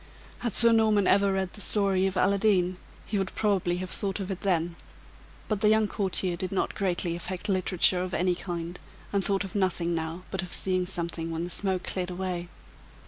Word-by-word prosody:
Had 235 -4 -3
Sir 235 -1 +10
Norman 215 -3 +3
ever 200 +1 +4
read 190 -1 -2
the 205 - -8
story 195 -3 +1
of 190 -1 -3
Aladdin, 190 -2 +2 0.3
he 205 - -1
would 190 -1 -3
probably 190 -4 +1
have 185 0 -5
thought 195 0 -2
of 195 0 -4
it 190 - -5
then; 175 -3 0 0.7
but 210 -2 -2
the 210 - +5
young 220 0 +3
courtier 190 -3 -1
did 185 +1 -4
not 195 - -1
greatly 180 -3 -1
affect 180 +1 -5
literature 185 -1 +3
of 185 0 -3
any 180 0 +2
kind, 175 -1 -5 0.3
and 200 -1 +1
thought 195 0 +1
of 195 - -8
nothing 185 -3 0
now 165 +2 -4
but 190 - -1
of 180 - -6
seeing 185 -1 +1
something 170 -2 -3
when 165 0 -3
the 175 - -5
smoke 190 0 -1
cleared 185 -1 -3
away. 180 -1 -4
185 Hz, 195 wpm, -27 LUFS, 175-200 Hz, 0.7 s, Sir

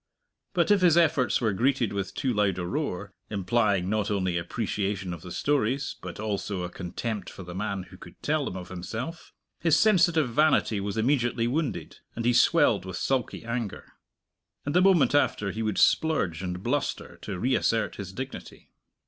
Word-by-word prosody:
But 170 +1 +3
if 205 -2 +5
his 175 -2 +5
efforts 150 -7 +3
were 110 -4 +1
greeted 120 +1 +1
with 100 -2 -3
too 130 -3 0
loud 100 -3 +1
a 90 - -3
roar, 100 - -3 0.2
implying 100 -1 +1
not 105 +1 0
only 95 -4 0
appreciation 95 +1 -2
of 85 - -8
the 90 - -9
stories, 135 +1 0
but 90 +1 -7
also 100 -3 -2
a 90 - -5
contempt 95 +3 -4
for 95 - -10
the 90 0 -8
man 100 0 -3
who 90 0 -14
could - - -14
tell 150 -1 +1
them 95 - -4
of 90 - -8
himself, 115 - -6 0.3
his 165 -3 +3
sensitive 170 - +4
vanity 150 -6 +3
was 100 +1 -3
immediately 120 -1 +1
wounded, 140 +3 -2 0.2
and 115 - -3
he 120 - +4
swelled - - +4
with 95 -1 -6
sulky 130 -4 -1
anger. 115 -3 -4 0.7
And 145 - -2
the 180 - +5
moment 185 -6 +5
after 105 -8 +2
he 110 - -4
would 110 -3 -1
splurge 95 - +2
and 90 0 -4
bluster 140 +5 -2
to 100 -3 -5
reassert 115 0 +1
his 95 -3 -6
dignity. 130 +6 -8
110 Hz, 175 wpm, -27 LUFS, 95-140 Hz, 0.7 s, if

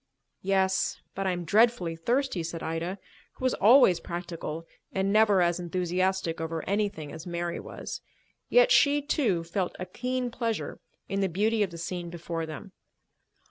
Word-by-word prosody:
"Yes, 190 0 +1
but 195 0 -2
I - - +2
am 175 -1 -3
dreadfully 205 -3 +3
thirsty," 240 +3 0
said 165 0 -5
Ida, 165 +4 -3 0.4
who - - -12
was 255 - +3
always 215 -5 +6
practical 170 -2 -5 0.3
and 195 +1 0
never 210 -4 +5
as 175 0 +1
enthusiastic 180 -1 -1
over 160 0 -4
anything 200 -7 -1
as 160 - -8
Mary 170 0 -2
was. - - -7 0.5
Yet - - +5
she, 290 0 +5
too, 230 - +1
felt 175 +2 -2
a 185 - -4
keen 250 +3 -2
pleasure 230 -2 -3 0.3
in 195 - -2
the 195 - +1
beauty 215 +5 +1
of 200 - +2
the 170 - -9
scene 175 +1 -4
before 170 -1 -4
them. 170 +6 -8
185 Hz, 160 wpm, -28 LUFS, 170-215 Hz, 0.5 s, always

